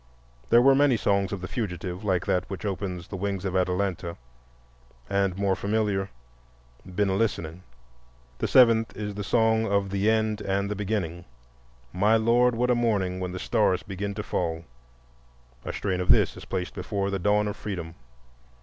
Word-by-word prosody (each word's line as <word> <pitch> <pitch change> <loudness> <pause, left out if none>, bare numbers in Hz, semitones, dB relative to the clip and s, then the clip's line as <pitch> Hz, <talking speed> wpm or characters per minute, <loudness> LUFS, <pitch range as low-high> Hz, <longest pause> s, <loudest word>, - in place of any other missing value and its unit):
There 120 +1 +6
were 135 +1 +7
many 135 -3 +4
songs 100 -2 +1
of 100 -3 -4
the 95 - -5
fugitive 90 -4 -4
like 95 -4 0
that 90 0 0
which 95 +1 -6
opens 95 -3 -4
"The - - -5
Wings 100 0 -3
of 95 -1 -2
Atalanta," 90 -1 -1 0.9
and 100 -2 0
the - - -9
more 100 -1 +2
familiar 100 -2 -1 0.7
"Been 95 +2 -1
a 95 - +1
listening." 90 -5 -1 0.8
The - - 0
seventh 115 -3 +4
is 105 -1 -4
the 105 +1 -5
song 110 +1 +2
of 100 -1 +1
the 100 +2 +1
End 110 -1 +1
and 100 0 -1
the - - -1
Beginning—"My 80 - -3
Lord, 120 +2 +3
what 125 +2 +1
a - - +5
mourning! 100 -6 0
when 90 -1 -3
the 90 - -5
stars 100 -3 +1
begin 100 0 -5
to - - -4
fall"; 80 -1 -2 1.0
a - - -4
strain 90 -1 -2
of 90 - -4
this - - +4
is - - -10
placed 90 -1 -3
before 100 +1 -2
"The 95 - -1
Dawn 105 +2 +2
of 105 - -3
Freedom." 90 -7 -5
100 Hz, 175 wpm, -26 LUFS, 90-105 Hz, 1.0 s, were